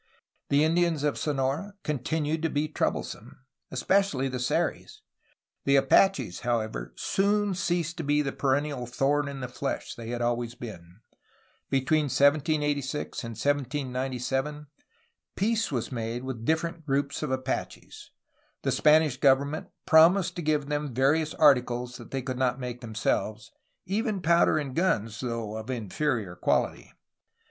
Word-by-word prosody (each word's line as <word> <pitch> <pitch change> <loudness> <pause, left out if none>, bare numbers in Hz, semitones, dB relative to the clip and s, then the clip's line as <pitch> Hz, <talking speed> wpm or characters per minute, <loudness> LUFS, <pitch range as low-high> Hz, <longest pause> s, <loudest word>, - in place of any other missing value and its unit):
The 140 +1 +4
Indians 165 -2 +2
of 150 -1 +1
Sonora 145 +7 -1
continued 150 +2 -1
to 165 - 0
be 150 +1 0
troublesome, 150 - -3 0.3
especially 140 0 +1
the 130 -1 -4
Seris. 125 - -1 0.6
The 140 - +4
Apaches, 135 - +3
however, 110 - -2
soon 205 +1 +1
ceased 175 -2 -1
to 165 - -3
be 145 0 +2
the 140 - -2
perennial 140 -2 -1
thorn 140 +4 +1
in 140 -1 -6
the 125 - -3
flesh 130 +2 -4
they 115 -2 -8
had 120 0 -3
always 120 0 -1
been. 90 -4 -10 0.7
Between 145 +3 +2
1786 145 0 +1
and 115 0 -5
1797 135 0 -1 0.7
peace 225 +1 0
was 125 -2 -2
made 115 0 -3
with 125 -4 -5
different 160 +2 0
groups 140 0 -1
of 150 - -2
Apaches. 130 0 -4 0.5
The - - +1
Spanish 155 -3 +4
government 140 +3 +2 0.2
promised 170 +4 +5
to - - -2
give 150 -2 +1
them 145 -3 -3
various 150 +4 +2
articles 125 -5 +3
they 135 -1 -3
could 130 -1 -4
not 130 0 +1
make 125 -1 -5
themselves, 110 -1 -2 0.2
— - - -48
even 210 +1 -1
powder 170 -1 +4
and 140 -4 -3
guns, 115 - 0
though 115 -4 -3
of 110 +3 -7
inferior 115 -3 -2
quality. - - 0
140 Hz, 135 wpm, -27 LUFS, 125-155 Hz, 0.7 s, promised